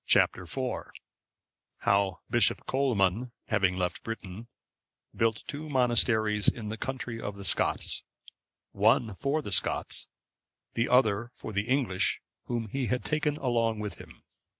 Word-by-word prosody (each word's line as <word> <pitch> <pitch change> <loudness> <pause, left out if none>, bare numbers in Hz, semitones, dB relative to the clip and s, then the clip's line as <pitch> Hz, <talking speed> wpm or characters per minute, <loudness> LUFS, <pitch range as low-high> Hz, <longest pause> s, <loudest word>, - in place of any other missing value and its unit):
Chap. - - +5
IV. 85 -2 -7 1.2
How 100 -2 +2
Bishop - - +3
Colman, 120 -3 +1 0.2
having 95 -4 +2
left 90 -1 -1
Britain, 115 -1 -7 0.7
built 115 -1 +1
two 150 +2 -6
monasteries 110 -5 +3
in 110 -2 +1
the 110 - -3
country 125 -2 -4
of 105 - -4
the 100 -1 -8
Scots; - - +1 0.7
the - - -16
one 110 +1 +4
for 145 +2 0
the 105 - -6
Scots, - - +1 0.7
the 115 - 0
other 120 -3 +3
for 110 - -7
the 100 +2 -1
English 130 -9 +1 0.3
whom 120 -2 -2
he 130 +2 -2
had 125 0 -1
taken 150 -1 0
along 115 -4 +1
with 105 -1 -5
him. - - -14
115 Hz, 140 wpm, -29 LUFS, 100-125 Hz, 1.2 s, Chap